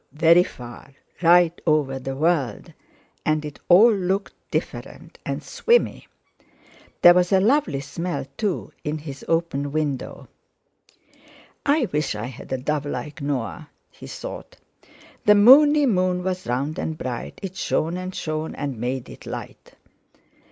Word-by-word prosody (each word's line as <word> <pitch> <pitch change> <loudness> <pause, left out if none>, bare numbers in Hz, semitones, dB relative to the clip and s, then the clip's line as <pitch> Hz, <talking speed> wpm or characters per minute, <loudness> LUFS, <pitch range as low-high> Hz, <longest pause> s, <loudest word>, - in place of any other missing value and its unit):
very 165 +3 +5
far; 125 -4 -9 0.3
right 175 0 +4
over 145 -4 +1
the 135 +1 -5
world, 145 -6 -1 0.5
and 155 0 0
it 150 - -8
all 215 +6 +7
looked 195 0 -1 0.2
different - - -5
and - - -3
swimmy. 475 +1 +1 1.0
There 175 - +10
was 180 +1 +2
a 190 - +5
lovely 200 - +2
smell, 165 +4 -4
too, 205 -2 -3
in 150 +1 -2
his 145 -2 -9
open 165 -4 -1
window. 145 -3 -3 1.4
'I 285 -4 +2
wish 150 -6 0
I 105 +2 -4
had 125 +1 -10
a 130 - 0
dove 145 +2 -2
like 145 +2 -6
Noah!' 140 +2 -3 0.2
he - - -12
thought. - - -8 0.7
"The 210 - +7
moony 290 +7 +7
moon 185 -5 +1
was 185 -3 -3
round 135 +6 -2
and 160 -1 -3
bright, 125 -4 -5
It 190 -1 -5
shone 165 -2 -1
and 185 +1 -5
shone 155 0 -4
and 140 -5 -4
made 125 +1 -3
it - - -12
light." - - -8
155 Hz, 140 wpm, -23 LUFS, 140-185 Hz, 1.4 s, There